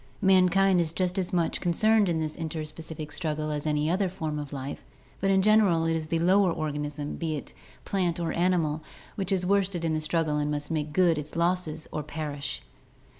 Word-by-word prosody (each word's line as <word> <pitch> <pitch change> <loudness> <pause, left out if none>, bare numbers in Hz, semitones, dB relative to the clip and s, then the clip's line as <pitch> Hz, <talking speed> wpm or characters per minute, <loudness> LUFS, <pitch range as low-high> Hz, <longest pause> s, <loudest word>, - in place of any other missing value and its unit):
Mankind 190 0 +5
is 160 -1 -2
just 180 +1 0
as 180 - -2
much 170 -2 0
concerned 210 +3 +3
in 165 -2 0
this 155 -1 -2
interspecific 160 -1 -6
struggle 155 -2 -2
as 150 0 -3
any 150 0 +1
other 185 +3 +1
form 160 -5 -3
of 145 -2 -6
life, 140 -1 -5 0.4
but 195 - +1
in 190 -1 +4
general 205 -6 +4
it 165 0 +1
is 160 -1 -3
the 165 - 0
lower 185 +2 +4
organism, 150 -2 -3
be 160 -2 -2
it 145 - -7 0.3
plant 180 -4 0
or 165 -2 -1
animal, 165 -4 +1 0.3
which 195 -2 -3
is 185 -2 +1
worsted 190 -3 +1
in 160 - +1
the 155 - 0
struggle 155 -1 0
and 150 0 0
must 145 +1 -3
make 155 -1 -1
good 170 -1 +3
its 150 0 -8
losses 170 -2 0
or 150 - -2
perish. 145 - -4
165 Hz, 195 wpm, -27 LUFS, 150-180 Hz, 0.4 s, Mankind